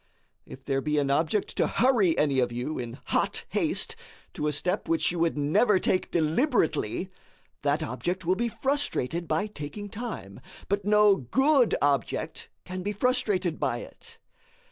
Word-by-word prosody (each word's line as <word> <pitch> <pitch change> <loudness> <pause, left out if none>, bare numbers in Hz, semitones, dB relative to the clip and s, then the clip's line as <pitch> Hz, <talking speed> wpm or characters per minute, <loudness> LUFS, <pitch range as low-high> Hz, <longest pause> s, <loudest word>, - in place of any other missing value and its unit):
If 130 0 -12
there 135 -1 0
be 150 +1 -1
an 140 -1 +1
object 160 +8 0
to - - +3
HURRY 225 -9 +3
any 140 -3 +2
of 125 -1 +1
you 125 +6 -3
in 120 -1 -6
hot - - 0
haste - - -1 0.4
to 150 - -2
a - - +1
step 180 +7 -2
which 165 +1 +2
you 175 - -4
would 165 -2 +1
never 155 +9 +3
take 185 0 0
DELIBERATELY, 170 - +1 0.5
that 145 +3 +1
object 175 +6 -3
will 180 - +3
be 235 +5 -1
frustrated 210 - -1
by 205 - +1
taking 205 +2 -7
time; 200 - -6 0.3
but 200 0 -1
no 210 -1 +5
good 265 - +3
object 140 -1 -1 0.2
can 185 0 -5
be 205 +3 -2
frustrated 200 -7 0
by - - 0
it. - - -12
175 Hz, 160 wpm, -27 LUFS, 145-210 Hz, 0.5 s, no